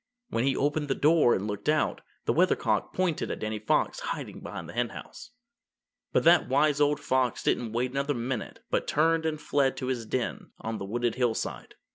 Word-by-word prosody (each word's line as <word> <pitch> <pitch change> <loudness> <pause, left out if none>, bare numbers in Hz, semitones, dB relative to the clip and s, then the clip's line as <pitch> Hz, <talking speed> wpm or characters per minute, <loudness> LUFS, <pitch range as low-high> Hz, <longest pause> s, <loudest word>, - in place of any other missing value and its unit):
When 115 - +1
he 135 -1 +2
opened 145 +1 0
the 135 - 0
door 150 -5 +4
and 95 - -2
looked 105 +5 -3
out, 155 0 +1 0.2
the - - +2
Weathercock - - +2
pointed 180 -4 -1
at - - -3
Danny 110 0 -3
Fox 105 - +1
hiding - - -5
behind - - -7
the - - -9
Henhouse. 120 - -4 0.8
But - - +2
that 170 +1 +6
wise 145 +2 +3
old 145 0 +3
fox 130 -4 0
didn't 115 -3 0
wait 125 +2 0
another 140 +2 -1
minute 120 0 -4
but - - 0
turned 160 +1 +2
and 155 -1 -2
fled 140 -2 +1
to - - -3
his 125 -3 -2
den 125 +1 -3
on 110 0 -4
the 100 - -4
wooded 120 +3 -1
hillside. 120 -3 -2
130 Hz, 190 wpm, -28 LUFS, 120-150 Hz, 0.8 s, that